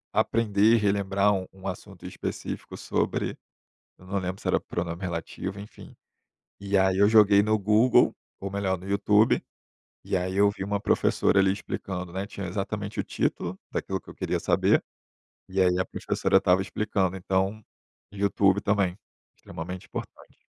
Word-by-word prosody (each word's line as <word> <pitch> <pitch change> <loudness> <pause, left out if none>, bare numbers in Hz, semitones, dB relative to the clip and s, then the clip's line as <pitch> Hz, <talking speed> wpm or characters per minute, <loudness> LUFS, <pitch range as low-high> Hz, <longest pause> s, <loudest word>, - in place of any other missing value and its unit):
aprender 110 0 +3
e - - +4
relembrar 100 -1 +2
um 95 -1 -3
um 95 0 -9
assunto 95 -1 -8
específico 90 - -6
sobre, - - -1 0.6
eu 90 - -17
não 100 +1 -2
lembro 95 +1 -4
se - - -18
era - - +3
pronome 85 0 -4
relativo, 95 +2 -4
enfim, 105 - -13 0.7
e 100 0 0
aí 95 0 +3
eu 100 +1 +6
joguei 105 -2 +6
no 110 +1 +2
Google, 110 +5 +4 0.2
ou 100 - -5
melhor 95 -1 -1
no 90 - -11
YouTube, 105 +2 +3 0.6
e - - 0
aí 95 +1 -2
eu 100 0 +5
vi 100 -1 -6
uma 100 0 -1
professora 100 - +2
ali 95 0 +4
explicando, 90 -2 -5
né, 95 +2 -3
tinha 100 -2 -6
exatamente 100 +2 -4
o - - 0
título 90 +2 -2
daquilo - - -3
que - - -14
eu - - -11
queria - - -2
saber, - - +3 0.7
e 95 +1 -1
aí 90 -1 +4
a 95 - +2
professora - - 0
estava 90 +1 +4
explicando, 95 -2 -1
então 95 +3 -1 0.5
YouTube 100 0 +2
também, 100 -3 +1 0.4
extremamente 90 +3 -8
importante. - - -9
95 Hz, 160 wpm, -26 LUFS, 95-100 Hz, 0.7 s, eu